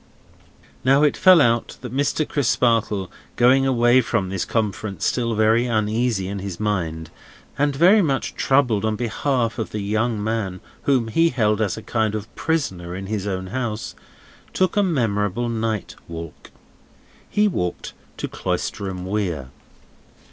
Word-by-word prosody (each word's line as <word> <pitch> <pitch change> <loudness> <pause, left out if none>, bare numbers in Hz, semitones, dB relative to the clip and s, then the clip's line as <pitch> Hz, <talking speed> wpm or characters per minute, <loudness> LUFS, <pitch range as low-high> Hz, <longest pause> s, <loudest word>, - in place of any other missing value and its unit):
Now, 135 +3 +4
it 150 - +3
fell 185 -2 +7
out 115 -4 +1
that 125 -1 -7
Mr. 145 +2 0
Crisparkle, 115 -7 +1 0.2
going 135 +2 +4
away 120 0 +4
from 110 -5 -1
this 95 -1 -2
conference 105 -2 -2
still 115 -2 0
very 110 +3 +3
uneasy 110 -2 0
in 100 +1 -4
his 95 -2 -6
mind, 80 -6 -2 0.4
and 145 0 +1
very 185 +9 +6
much 140 -7 -1
troubled 125 -7 +2
on 110 -1 0
behalf 120 +1 -1
of 110 - -2
the 105 - -4
young 110 +3 0
man 105 -4 -2 0.3
whom 130 -5 +2
he 165 +8 +3
held 105 -5 +1
as 105 -1 0
a 110 - -8
kind 110 -2 0
of 110 -1 -6
prisoner 95 - -2
in 95 +1 -6
his 105 0 -3
own 95 -1 -3
house, 120 -4 -3 0.6
took 185 0 +1
a 205 - +4
memorable 120 - 0
night 110 -2 -2
walk. 85 -1 -9 0.8
He 210 0 +3
walked 90 - -3 0.2
to - - -3
Cloisterham 95 -2 -3
Weir. 90 -10 -2
110 Hz, 150 wpm, -22 LUFS, 100-130 Hz, 0.8 s, fell